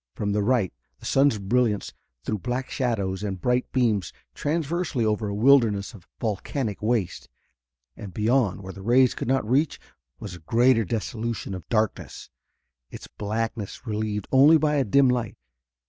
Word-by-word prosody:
From 105 -1 -2
the 105 +1 +1
right 110 -3 +1 0.2
the - - -14
sun's 135 -4 +3
brilliance 105 +1 0 0.3
threw 105 - -2
black 125 +4 -3
shadows 100 -7 -1
and 100 -3 -4
bright 125 +4 0
beams 110 -9 +1 0.2
transversely 155 - -1
over 105 0 0
a 100 - -3
wilderness 110 -4 +3
of 95 -6 -15
volcanic 110 +1 -3
waste. 110 -4 -1 0.7
And 100 -3 -9
beyond, 110 -2 +1
where 95 0 -7
the 100 - -10
rays 125 +4 +4
could - - -5
not 130 -4 +1
reach, 140 +6 +1 0.4
was - - -8
a 90 - -9
greater 115 +7 +3
desolation 115 0 -3
of 95 - -8
darkness, 110 -2 -2 0.6
its - - -10
blackness 110 0 -4
relieved 105 -2 -3
only 145 +5 +7
by 150 -1 +1
a 140 - +3
dim 135 +5 +4
light. 120 -4 -1
115 Hz, 155 wpm, -25 LUFS, 100-130 Hz, 0.7 s, only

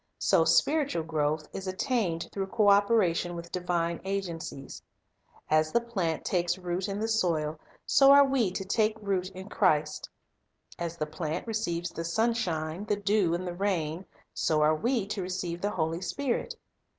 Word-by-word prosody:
So - - +3
spiritual 285 - +2
growth 155 -1 -1
is 190 0 -6
attained 185 -4 -1
through 195 -1 -3
co 205 +1 +3
operation 200 -4 +3
with 170 0 -8
divine 170 -2 -1
agencies. 175 -8 -5 0.7
As 155 0 +2
the 235 - +3
plant 190 -9 -2
takes 175 0 0
root 180 0 -3
in 200 +1 -3
the 220 - -1
soil, 165 -8 0 0.3
so 275 - +5 0.2
we 270 -5 +2
are - - -3
to 195 - -4
take 215 +2 +1
root 195 -3 -1
in 190 +1 -8
Christ. 150 -7 +1 0.7
As 170 -1 -4
the 155 - -1
plant 155 0 -4
receives 175 -7 -2
the 165 - -5
sunshine, 175 -3 -1
the 210 - +1
dew, 200 -4 +1
and 180 +2 -4
the 175 - -4
rain, 175 -3 -1 0.3
so 155 -1 +1
are 155 +1 +4
we 235 +5 0
to 205 0 -4
receive 180 -1 -4
the 205 - 0
Holy 165 -2 -2
Spirit. 245 +7 -2
180 Hz, 165 wpm, -28 LUFS, 165-205 Hz, 0.7 s, so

